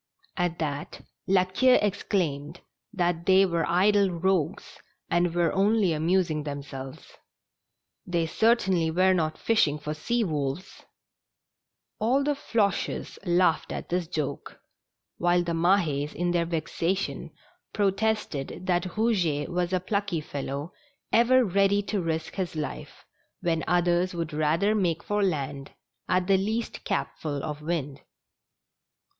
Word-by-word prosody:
At 175 -2 -1
that 145 -3 -4 0.3
La 185 -1 +4
Queue 250 +8 +4
exclaimed 175 -7 -1 0.3
that 175 -4 -1
they 190 +1 +6
were 170 -3 0
idle 200 +3 +4
rogues, 180 -1 -1 0.3
and 175 0 +2
were 170 -2 +2
only 200 -2 +3
amusing 165 0 +1
them 145 -1 -5
selves. 135 -1 -10 0.9
They 170 -2 0
certainly 190 -3 +2
were 185 +3 +3
not 160 -3 0
fishing 160 -10 +2
for 150 0 -4
sea 235 +10 -1
wolves! 150 0 -3 1.2
All 255 +6 +2
the 295 +1 +1
Floches 225 -9 -1
laughed 175 -2 +2
at - - -5
this 175 -1 -1
joke, 150 -4 -4 0.6
while 175 0 +3
the 170 - -3
Mah^s, 165 -4 +1
in 175 0 0
their 170 -1 +1
vexation, 170 +3 -2 0.4
protested 200 -8 -1
that 180 -1 +1
Ilouget 180 -10 +1
w^as 175 0 -1
a 185 - +2
plucky 200 -2 -1
fellow, 145 +1 -5 0.4
ever 245 +2 +5
ready 200 +1 +2
to 205 -1 -2
risk 160 -1 -3
his 185 -4 -3
life, 155 -1 -6 0.4
when 165 -2 0
others 175 +1 +2
would 165 -3 -3
rather 155 +7 +2
make 175 -6 0
for 205 0 -1
land 140 -7 -2 0.4
at 180 0 +2
the 195 0 +4
least 220 +4 -3
capful 145 -3 -3
of 150 -1 -5
wind. 150 -4 -3
175 Hz, 130 wpm, -27 LUFS, 155-195 Hz, 1.2 s, they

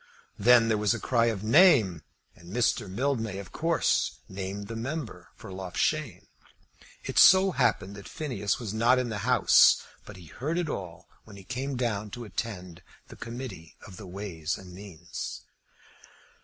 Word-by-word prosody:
Then 115 +2 +6
there 110 -2 +1
was 105 -2 +2
a - - -5
cry 115 -2 +1
of 110 -4 -2
"name;" 115 - +5 0.3
and 85 +2 -14
Mr. 115 -2 0
Mildmay 115 -2 -2
of 100 -3 -9
course - - 0
named 100 +1 -6
the 115 - -6
member 130 +2 -6
for - - -11
Loughshane. 95 -2 -2 0.8
It - - 0
so 190 +1 +7
happened 100 - 0
that 100 - -10
Phineas 120 -11 -2
was 115 -6 -6
not 115 +3 +3
in 125 -1 -1
the 105 -2 -4
House, 125 - +5 0.2
but - - -12
he 90 - -13
heard 145 - -4
it 175 -3 -1
all 90 -10 -7 0.2
when 105 - -14
he 100 - -12
came 130 +6 -4
down 110 -4 -2
to 120 - -7
attend 90 -4 -6 0.3
the - - -11
Committee 115 -9 -8
of 95 -4 -12
Ways 90 -5 -5
and 90 -2 -12
Means. 90 -3 -8
105 Hz, 160 wpm, -27 LUFS, 95-125 Hz, 0.8 s, so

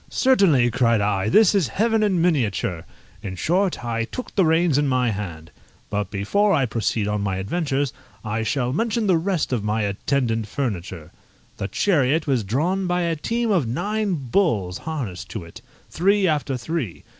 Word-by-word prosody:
"Certainly," 175 - +3
cried 115 -3 +2
I, 100 0 0
"this 215 - +5
is 195 -8 +2
heaven 225 - +1
in 200 -4 +2
miniature!" 115 - 0 0.4
In 95 -2 -5
short, 180 - 0
I 115 -1 -1
took 255 - -7
the 190 - +3
reins 160 -2 +3
in 145 - +1
my 125 -3 +1
hand. 85 -6 -6 0.4
But 105 0 -1
before 195 - +1
I 140 -4 +2
proceed 110 -2 -1
on 105 0 -1
my 100 -2 -1
adventures, 140 - -1 0.3
I 110 +1 -2
shall 125 +2 -1
mention 225 - 0
the 190 -3 +4
rest 175 -5 -1
of 115 -5 -1
my 105 +1 0
attendant 115 +2 -1
furniture. 95 - -4 0.5
The 95 - -3
chariot 155 - +1
was 130 -6 +1
drawn 170 - 0
by 180 0 0
a 170 -1 0
team 230 +8 -1
of 170 - +2
nine 200 - -1
bulls 120 - 0
harnessed 120 - -5
to 110 -5 -6
it, 85 - -12 0.3
three 195 +3 +2
after 145 -4 0
three. 125 - -4
135 Hz, 170 wpm, -22 LUFS, 105-180 Hz, 0.5 s, this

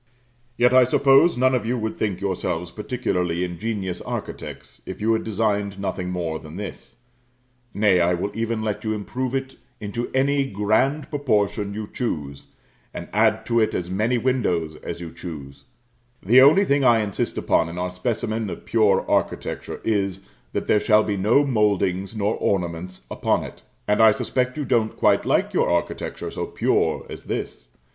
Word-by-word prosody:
Yet 125 +1 +4
I 130 0 +7
suppose 135 +6 +4
none 130 +1 +3
of 125 - +1
you 120 +3 -1
would 110 -1 -3
think 105 -4 -2
yourselves 90 -3 -2
particularly 90 -7 -2
ingenious 95 +1 -3
architects - - -7
if - - -6
you 115 +2 +2
had 110 - 0
designed 105 -2 -1
nothing 95 -2 -3
more 85 -3 -3
than 80 +1 -11
this; 100 0 -8 0.8
nay, 100 -3 +3
I 90 +1 +3
will 95 +4 -3
even 115 0 -2
let 105 -2 -3
you 110 -1 -1
improve 125 +5 -3
it 135 0 -4 0.2
into 110 +3 -4
any 135 +1 +1
grand 120 +9 +1
proportion 105 -7 0
you 110 0 -4
choose, 75 - -4 0.5
and - - -6
add - - +2
to 115 -1 +2
it 110 -1 +1
as 90 0 -3
many 110 +6 +1
windows 95 -11 0
as 85 - -7
you 85 -2 -7
choose; 70 -5 -9 0.6
the 120 +6 +7
only 155 +9 +6
thing 140 -4 +2
I 120 -3 +5
insist 100 -3 -2
upon - - +2
in 85 - -7
our 90 0 -2
specimen 110 +2 -2
of - - -8
pure 110 -3 +3
architecture - - -2
is, 100 -3 -1 0.3
that - - -2
there 105 - +3
shall 105 +1 +4
be 105 - -1
no 110 +9 +3
mouldings 100 -4 +1
nor 105 0 0
ornaments 90 -1 -2
upon - - 0
it. - - -10 0.3
And 105 +1 +3
I 110 - +8
suspect 125 +4 -1
you 150 - -2
don't 115 -3 +1
quite - - +3
like - - +1
your - - +2
architecture 85 0 -2
so - - -4
"pure" - - 0
as - - -9
this. - - -5
105 Hz, 170 wpm, -23 LUFS, 90-120 Hz, 0.8 s, I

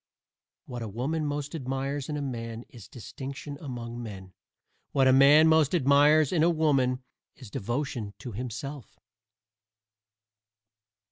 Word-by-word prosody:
What 120 -2 -7
a 115 - -4
woman 140 +9 -2
most 145 +1 -4
admires 135 -1 -3
in 150 - -2
a 145 - -3
man 115 -3 -5
is 115 -5 -13
distinction 135 +5 -8
among 120 -4 -6
men. 95 -5 -9 0.6
What 135 -1 +4
a 130 - +6
man 145 +4 +7
most 160 0 +4
admires 145 0 +4
in 165 - +2
a 165 - +5
woman 135 -6 +1 0.3
is 125 -6 -13
devotion 120 -2 -3
to 125 - -8
himself. 125 +5 -7
135 Hz, 130 wpm, -28 LUFS, 120-145 Hz, 0.6 s, man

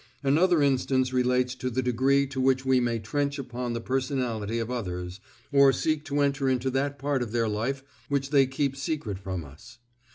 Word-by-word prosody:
Another 160 +3 +3
instance 130 -1 +1
relates 125 0 +2
to 130 0 -4
the 130 +1 -1
degree 130 +3 +2
to 135 -1 -4
which 130 0 +2
we 130 -1 +4
may 120 -1 0
trench 140 +6 -2
upon 125 -2 -4
the 115 - -2
personality 125 -4 -2
of 115 +1 -3
others, 90 -5 -4 0.3
or 140 -1 +6
seek 155 +3 -1
to 145 -1 0
enter 140 -1 +1
into 130 0 0
that 140 +2 -1
part 140 -1 -1
of 120 -3 -3
their 115 -1 +1
life 120 +6 -2 0.3
which 140 -1 -1
they 135 -3 +5
keep 135 0 -1
secret 135 -8 -3
from 95 -4 -5
us. 105 - -14
130 Hz, 190 wpm, -27 LUFS, 120-140 Hz, 0.3 s, or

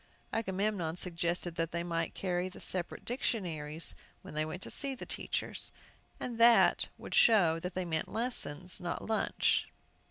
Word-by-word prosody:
Agamemnon 195 -5 -1
suggested 175 -1 -1
that 165 0 0
they 170 0 -2
might 165 -1 -2
carry 180 -1 -1
the - - -12
separate 180 -2 0
dictionaries 170 - -1 0.3
when - - -9
they 155 0 +1
went 160 +4 -5
to - - -6
see 275 -2 -2
the - - -8
teachers, - - -2 0.5
and 235 -2 -4
that 235 0 +6
would - - -8
show 175 -8 +5
that 180 +2 -5
they 185 -1 -1
meant 160 -2 -1
lessons, 185 - 0
and 180 - -9
not 170 - -3
lunch. 220 -1 +2
180 Hz, 160 wpm, -32 LUFS, 165-215 Hz, 0.5 s, that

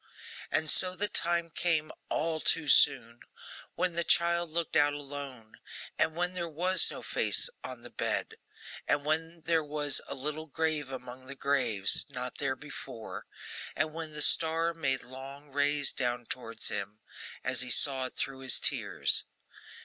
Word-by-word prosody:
And 155 - +1
so 185 +4 +5
the 205 +2 +1
time 170 -4 +1
came 160 -2 0 0.2
all 160 -1 -1
too 160 0 +1
soon! 130 -4 +4 0.6
when 180 0 0
the 170 +1 0
child 170 0 +2
looked 170 +1 0
out 145 -2 +4
alone, 140 -6 -8 0.4
and 160 - +2
when 175 +1 -1
there 170 -2 -2
was 180 +4 +3
no - - -8
face - - +2
on - - -8
the - - -11
bed; 445 - -3 0.5
and 145 0 +1
when 160 +2 -1
there 165 0 +1
was 145 -1 +2
a - - -5
little 150 +3 -4
grave 155 -1 -1
among 130 0 -9
the 140 - -6
graves, 125 -9 +3
not 125 -2 -6
there 135 -2 -1
before; 135 -5 -9 0.5
and 155 0 -1
when 160 -1 -6
the 150 0 +3
star 165 +1 +3
made 135 -5 -1
long 135 +3 -10
rays 145 0 +1
down 120 -2 -2
towards 115 -2 -3
him, 105 +2 -5 0.4
as - - +2
he - - -2
saw 130 -2 +3
it - - -16
through 135 -1 -2
his 130 -1 +2
tears. - - +1
145 Hz, 160 wpm, -30 LUFS, 130-165 Hz, 0.6 s, so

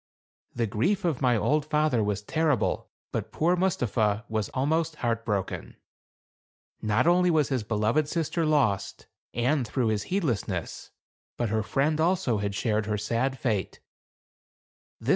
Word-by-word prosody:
The 120 - +1
grief 180 - 0
of 160 -6 0
my 125 -3 +3
old 150 +7 +2
father 150 -6 +1
was 105 0 -1
terrible; 155 -1 0 0.2
but - - -3
poor 170 +3 +2
Mustapha 115 - 0
was 110 -2 -2
almost 155 +4 0
heart 115 -4 -1
broken. 100 -4 -3 1.1
Not 110 +5 +2
only 180 +1 +4
was 155 -4 +2
his 130 -4 0
beloved 110 +7 +1
sister 165 +1 -1
lost, 140 -11 +1 0.3
and 125 +2 +1
through 120 0 0
his 105 -2 0
heedlessness, 115 - -2 0.5
but 120 -2 0
her 110 +1 +1
friend 150 +8 +1
also 170 - +1
had 100 -1 -2
shared 110 0 0
her 105 -1 0
sad 115 +6 -1
fate. 110 -7 -2
125 Hz, 140 wpm, -27 LUFS, 110-155 Hz, 1.1 s, only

